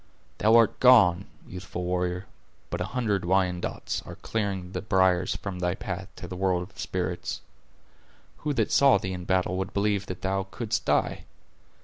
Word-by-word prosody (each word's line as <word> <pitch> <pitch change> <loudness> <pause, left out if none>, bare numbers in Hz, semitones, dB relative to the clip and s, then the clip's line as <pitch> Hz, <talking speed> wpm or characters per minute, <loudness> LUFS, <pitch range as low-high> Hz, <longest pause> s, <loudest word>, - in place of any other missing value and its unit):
Thou 110 +2 +5
art 115 -1 +4
gone, 100 -8 +6 0.2
youthful 90 -1 -6
warrior, 90 +1 -1 0.5
but - - -3
a - - 0
hundred 110 -6 -1
Wyandots 90 -1 -1
are - - -9
clearing 100 -4 -3
the 90 - -3
briers 95 -3 +2
from 95 -3 -5
thy 90 0 0
path 95 +1 -5
to 90 - -8
the 90 - -6
world 90 -1 +1
of 95 - -13
the - - -18
spirits. 90 -1 -3 1.0
Who 150 - -2
that - - +1
saw 140 -5 +6
thee 95 -2 -4
in 90 -1 -6
battle 95 0 +1
would 95 +1 -4
believe 100 -1 +1
that 95 - -7
thou 95 0 -1
couldst 110 +2 -3
die? - - +1
95 Hz, 170 wpm, -27 LUFS, 90-100 Hz, 1.0 s, gone